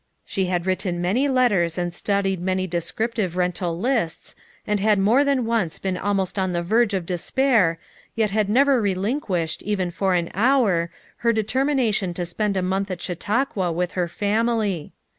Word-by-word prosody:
She 190 - -1
bad 180 -1 -1
written 185 -1 -1
many 205 +11 +1
letters 205 -11 +2
and 175 -1 -2
studied 195 -1 -1
many 185 +1 -1
descrip 180 +7 -2
tive 185 -7 -2
rental 180 -1 -1
lists, 210 -6 -1 0.3
and 210 -1 0
had 210 +1 +3
more 220 +8 +4
than 275 -4 +1
once 220 -8 0
been 190 -1 -2
almost 195 0 -1
on 185 -1 0
the 175 0 -1
verge 215 +3 +2
of 185 -3 -2
despair, 185 0 +1 0.4
yet 220 -3 +1
had 210 -1 +1
never 265 +2 +4
relinquished, 190 - -1
even 190 -4 -1
for 190 +1 0
an 170 -1 -1
hour, 205 -6 +2 0.3
her 235 - +2
determina 250 +2 +1
tion 185 -4 -1
to 175 - -2
spend 200 +3 -1
a 185 - 0
month 190 +2 -1
at 185 -2 -4
Chautauqua 200 +1 -1
with 180 +2 -1
her 180 -2 -1
family. 210 -3 -1
195 Hz, 175 wpm, -23 LUFS, 180-225 Hz, 0.4 s, more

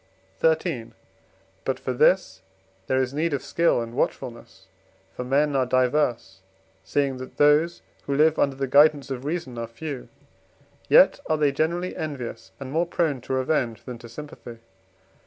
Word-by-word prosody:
XIII. 160 -7 +1 0.7
But 135 - -2
for 130 - -3
this 180 +9 +2 0.5
there 130 - +1
is 130 0 -1
need 160 +2 0
of 135 - -5
skill 170 -6 +2
and 115 0 -9
watchfulness. 120 -2 -4 0.5
For - - -4
men 140 +3 +1
are 130 -2 +2
diverse 125 -7 +1 0.4
(seeing 135 +6 0
that 130 0 -10
those 150 +4 +3 0.2
who 140 - 0
live 155 +2 +3
under 140 -1 +2
the 135 0 -2
guidance 145 +1 +4
of 130 0 -5
reason 145 -6 -4
are 115 - -4
few), 130 +3 -7 0.8
yet - - +6
are 155 - +2
they 150 -2 +2
generally 170 +5 -1
envious 140 -6 -6
and 135 -1 -7
more 165 +3 +1
prone 155 -7 0
to 130 - -5
revenge 130 -3 0
than 125 -2 -8
to 120 - -12
sympathy. 120 -2 -10
140 Hz, 155 wpm, -25 LUFS, 125-155 Hz, 0.8 s, yet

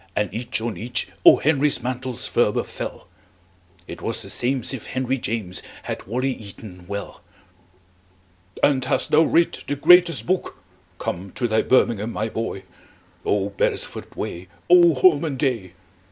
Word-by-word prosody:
and 105 -3 -1
each 120 +3 -2
on 110 -4 -4
each 120 +6 -2
O. - - +9
Henry's 145 -4 +1
mantles 125 -1 -2
ferber - - +1
fell. - - -7 0.8
It - - -8
was - - -3
the - - -9
same'sif 130 -1 -2
henryjames 120 -7 -2 0.2
Had - - -6
wally 130 +5 -1
eaton 100 -5 -11
well. 100 0 -6 1.4
"And 135 -3 +3
hast 130 0 0
thou 155 - +6
writ 165 +1 +2
the 145 - -1
greatest 175 +2 +5
book? 185 +1 -1 0.4
Come 95 +2 -4
to 125 -2 -1
thy 110 -1 +2
birmingham, 115 -4 +2
my 110 +1 -2
boy! 110 -4 -4 0.6
Oh, 100 -1 0
beresford 100 - -2
way! 90 +2 -5 0.2
Oh, 175 -3 +7
holman 145 -1 +3
day!" 115 -10 -1
125 Hz, 140 wpm, -22 LUFS, 105-140 Hz, 1.4 s, O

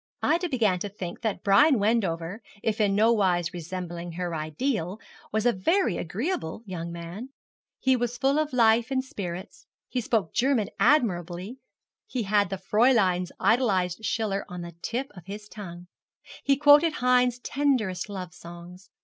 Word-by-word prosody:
Ida 345 +2 +2
began 215 - +2
to 205 - -4
think 185 -3 -7
that 220 -3 -2
Brian 230 +8 +5
Wendover, 200 -3 0 0.2
if 220 0 0
in 200 -2 +2
nowise 195 -6 +2
resembling 175 0 -6
her 175 0 -3
ideal, 165 - -2 0.3
was 220 +1 0
a 245 - +4
very 230 - +1
agreeable 210 - -3
young 170 -3 -5
man. 170 +9 -7 0.5
He 260 0 +2
was 240 0 -2
full 275 +4 +2
of 310 -1 -1
life 230 -1 +4
and 260 -1 0
spirits; 200 - -7 0.2
he 250 - -2
spoke 215 -7 0
German 240 -5 +2
admirably. 190 - +1 0.5
He 255 - -2
had 205 -1 +2
the 195 - -3
Fräulein's 200 -5 +2
idolized 195 -5 +2
Schiller 210 -3 -1
on 180 0 -6
the 170 - -7
tip 255 +4 -3
of 180 -1 -13
his 210 +1 -7
tongue. 175 -5 -9 0.6
He 275 -1 +3
quoted 295 +3 +6
Heine's 250 -2 +3
tenderest 245 -9 -1
love 185 -3 -6
songs. 175 +3 -12
210 Hz, 150 wpm, -26 LUFS, 180-250 Hz, 0.6 s, quoted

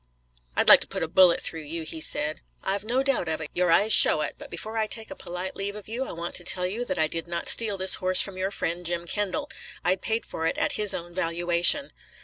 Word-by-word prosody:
"I'd - - +1
like - - +10
to - - -3
put - - -4
a - - -2
bullet 180 +1 +4
through 160 - 0
you," 160 +2 -6
he 160 0 -6
said. 155 0 0 0.2
"I've 195 +1 -2
no 245 +5 -1
doubt 270 -11 -1
of 160 - -2
it, 155 - -8
your 180 0 0
eyes 210 +6 +4
show 155 - +6
it, 150 - -4
but - - -11
before 215 +6 -5
I 220 -1 -1
take 220 0 -4
a - - -7
polite 180 +2 -7
leave 200 +1 -5
of 210 - -11
you 240 +5 -4
I - - -7
want 170 +1 -7
to 175 - -4
tell 180 +1 +3
you 210 +7 -4
that 185 -5 -4
I 160 - +2
did 165 +2 -5
not 170 0 -5
steal 215 -4 +2
this 190 0 +5
horse 185 0 +5
from 195 - +4
your 185 +1 -3
friend, 175 -3 -4
Jim 170 0 -3
Kendall. 205 - -3 0.4
I 180 +1 +2
paid 220 +4 -4
for 160 - -4
it - - -3
at - - 0
his 210 -1 0
own 175 +1 -8
valuation." 175 - +2
180 Hz, 260 wpm, -25 LUFS, 170-210 Hz, 0.4 s, like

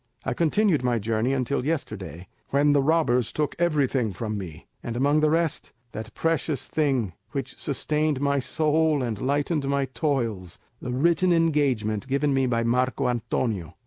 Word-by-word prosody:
I 135 - 0
continued 170 - +2
my 120 -1 +2
journey 115 +3 0
until 135 0 0
yesterday, 95 - -4 0.2
when 145 +1 +3
the 145 -1 +4
robbers 135 -6 +2
took 150 -1 -2
everything 140 - +1
from 110 +3 -4
me, 90 -6 -7 0.2
and 120 0 -4
among 145 +4 +3
the 155 0 +3
rest, 165 -1 0 0.2
that 110 +1 -8
precious 165 -3 -1
thing 135 - 0 0.2
which - - -5
sustained 150 -2 -1
my 140 0 +1
soul 155 +1 +1
and 110 -4 -3
lightened 145 +2 0
my 140 -1 +1
toils, 120 - -2 0.2
the 125 - -5
written 170 +7 +2
engagement 140 - +1
given 140 +1 +1
me 135 -1 +2
by 115 -1 +1
Marco 125 +3 +1
Antonio. 110 - -2
135 Hz, 155 wpm, -25 LUFS, 120-150 Hz, 0.2 s, the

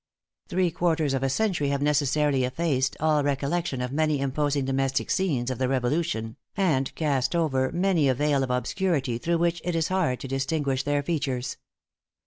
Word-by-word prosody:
Three 180 -1 +1
quarters 160 -4 +1
of 135 - 0
a 135 - +1
century 180 -2 0
have 140 0 0
necessarily 145 -1 +2
effaced 130 0 0
all 155 -1 +2
recollection 140 0 -1
of 125 0 -3
many 155 0 +1
imposing 140 0 0
domestic 135 0 0
scenes 140 -11 0
of 130 - -4
the 130 - +1
Revolution, 130 -2 -1 0.2
and 155 -9 +1
cast 145 -1 0
over 135 -6 +1
many 175 -5 +2
a 130 - +2
veil 145 0 +1
of 130 - -1
obscurity 130 -1 0
through 170 +6 0
which 170 0 0
it 175 -1 -2
is 160 -1 0
hard 180 -10 0
to - - -5
distinguish 135 0 -1
their 145 +1 0
features. 135 -6 -2
145 Hz, 170 wpm, -26 LUFS, 130-165 Hz, 0.2 s, necessarily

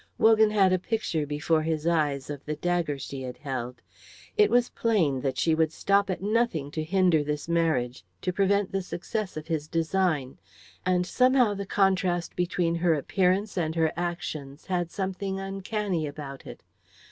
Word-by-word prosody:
Wogan 220 -1 +5
had 195 -3 +4
a 185 - +2
picture 175 -7 -2
before 155 +2 +1
his 155 -1 -2
eyes 150 -5 +1
of 145 -2 -7
the 150 - -3
dagger 170 -2 -1
she 135 0 -6
had 125 -1 -6
held. 125 -4 -5 0.5
It 425 -1 +5
was 245 0 +3
plain 170 - +1
that 130 -1 -2
she 160 +5 +2
would 160 -1 +2
stop 200 +4 +2
at 185 0 -3
nothing 205 -10 0
to 155 0 -3
hinder 175 -2 +3
this 150 +1 -3
marriage, 160 -8 0 0.2
to 180 - 0
prevent 200 +1 +2
the 195 - -1
success 190 +1 -4
of 155 - -5
his 155 -2 -2
design; 165 -5 0 0.5
and 180 -1 +2
somehow 250 0 +3
the 200 -1 -5
contrast 185 -3 +1
between 175 -1 0
her 170 -1 +2
appearance 190 +7 0
and 160 -1 -1
her 160 -1 +2
actions 155 -5 -4
had 175 -2 -1
something 190 +1 -3
uncanny 195 -3 -2
about 140 -2 -8
it. - - -10
175 Hz, 170 wpm, -27 LUFS, 150-195 Hz, 0.5 s, Wogan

